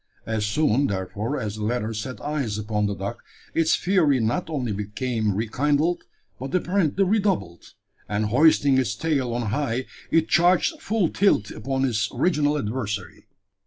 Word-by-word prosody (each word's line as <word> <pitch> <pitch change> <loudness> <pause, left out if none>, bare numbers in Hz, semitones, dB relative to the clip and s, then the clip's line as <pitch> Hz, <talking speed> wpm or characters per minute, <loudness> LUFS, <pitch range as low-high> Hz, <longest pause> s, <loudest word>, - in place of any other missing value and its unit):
As 110 -2 -1
soon, 140 +2 +2
therefore, 100 +7 -3
as 105 -1 -4
the 105 - -4
latter 115 0 -1
set 110 +1 -5
eyes 140 -8 -2
upon 105 -1 -1
the 100 - -2
dog, 95 +2 -4 0.4
its 165 -1 +3
fury 170 -8 +2
not 120 +10 -1
only 130 -7 -2
became 105 +1 -2
rekindled, 145 - 0 0.3
but 135 +4 -4
apparently 180 0 +1
redoubled; 195 - -1 0.3
and, 105 +1 0
hoisting 140 +3 +4
its 130 - -1
tail 140 -7 0
on 115 -3 -2
high, 130 -1 -1 0.2
it 165 -1 +3
charged 180 - +3
full 205 -6 +1
tilt 180 - +2
upon 135 +4 -1
its 110 -4 0
original 150 -4 +2
adversary. 105 -5 -4
130 Hz, 150 wpm, -24 LUFS, 105-155 Hz, 0.4 s, hoisting